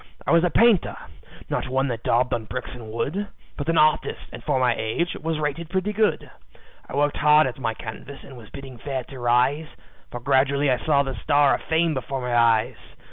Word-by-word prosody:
"I -, -, 0 dB
was 170 Hz, 0 st, +5 dB
a 180 Hz, -, +3 dB
painter 225 Hz, -1 st, +3 dB, 0.5 s
not -, -, -2 dB
one 135 Hz, +1 st, 0 dB
that 115 Hz, -2 st, -4 dB
daubed 125 Hz, +2 st, +1 dB
on 115 Hz, -2 st, -2 dB
bricks 125 Hz, +3 st, -6 dB
and 115 Hz, -3 st, -9 dB
wood, 175 Hz, -, -2 dB, 0.3 s
But 145 Hz, +2 st, -4 dB
an 165 Hz, -, +2 dB
artist, 155 Hz, 0 st, +1 dB
and -, -, -9 dB
for 145 Hz, -4 st, 0 dB
my 125 Hz, -2 st, +3 dB
age, 110 Hz, +11 st, -2 dB
was 160 Hz, 0 st, -2 dB
rated 155 Hz, +2 st, -3 dB
pretty 190 Hz, +3 st, -1 dB
good. 215 Hz, 0 st, +1 dB, 0.6 s
I -, -, -6 dB
worked 145 Hz, +1 st, +1 dB
hard 150 Hz, +1 st, +5 dB
at 130 Hz, 0 st, -4 dB
my 115 Hz, -3 st, -2 dB
canvas, 120 Hz, +6 st, -9 dB
and 135 Hz, -, -12 dB
was 115 Hz, -4 st, -13 dB
bidding 135 Hz, -3 st, -10 dB
fair 135 Hz, -1 st, -4 dB
to 130 Hz, +1 st, -11 dB
rise, 125 Hz, +6 st, +2 dB, 0.4 s
For 120 Hz, -, -6 dB
gradually 140 Hz, +2 st, +2 dB
I 125 Hz, -2 st, -1 dB
saw 140 Hz, -3 st, +3 dB
the 135 Hz, -1 st, -4 dB
star 145 Hz, -2 st, +3 dB
of -, -, -2 dB
fame 160 Hz, 0 st, +1 dB
before 135 Hz, 0 st, -4 dB
my 125 Hz, -1 st, -2 dB
eyes. 115 Hz, +1 st, +3 dB
135 Hz, 210 wpm, -23 LUFS, 125-155 Hz, 0.6 s, was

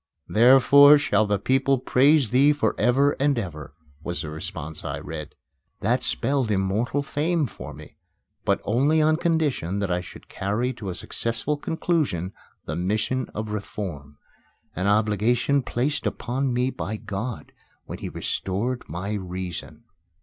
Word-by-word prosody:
"Therefore 135 Hz, +5 st, +7 dB
shall 110 Hz, -7 st, +2 dB
the 105 Hz, 0 st, +1 dB
people 135 Hz, +6 st, +2 dB
praise 135 Hz, +1 st, +3 dB
thee 140 Hz, +4 st, +5 dB
for 125 Hz, -7 st, 0 dB
ever 130 Hz, +6 st, +4 dB
and 140 Hz, -1 st, +2 dB
ever," 75 Hz, -, -6 dB, 0.3 s
was 85 Hz, +1 st, -4 dB
the 75 Hz, -, -6 dB
response 80 Hz, -2 st, -6 dB
I 70 Hz, 0 st, -3 dB
read. 75 Hz, 0 st, -7 dB, 0.5 s
That -, -, +1 dB
spelled 130 Hz, -, 0 dB
immortal 105 Hz, +8 st, 0 dB
fame 155 Hz, +2 st, 0 dB
for -, -, -8 dB
me, -, -, -13 dB, 0.5 s
but -, -, +1 dB
only 140 Hz, +8 st, +2 dB
on 155 Hz, 0 st, +3 dB
condition 155 Hz, -, 0 dB
that 100 Hz, -2 st, -1 dB
I 90 Hz, 0 st, 0 dB
should 90 Hz, -, -12 dB
carry 115 Hz, +6 st, -2 dB
to 105 Hz, -5 st, -7 dB
a 90 Hz, -, -4 dB
successful 115 Hz, +6 st, -2 dB
conclusion 145 Hz, -, -1 dB, 0.3 s
the 75 Hz, -, -4 dB
mission 105 Hz, +8 st, -1 dB
of 110 Hz, 0 st, -4 dB
reform 85 Hz, -9 st, -6 dB, 0.6 s
an 95 Hz, +2 st, -1 dB
obligation 110 Hz, +6 st, +2 dB
placed 130 Hz, +4 st, -1 dB
upon 130 Hz, +2 st, -2 dB
me 125 Hz, +2 st, +1 dB
by 110 Hz, -2 st, -4 dB
God 105 Hz, +3 st, -5 dB, 0.3 s
when -, -, -7 dB
He -, -, -5 dB
restored 115 Hz, +7 st, -2 dB
my 90 Hz, +6 st, -4 dB
reason. 95 Hz, 0 st, -5 dB
110 Hz, 145 wpm, -24 LUFS, 95-135 Hz, 0.6 s, Therefore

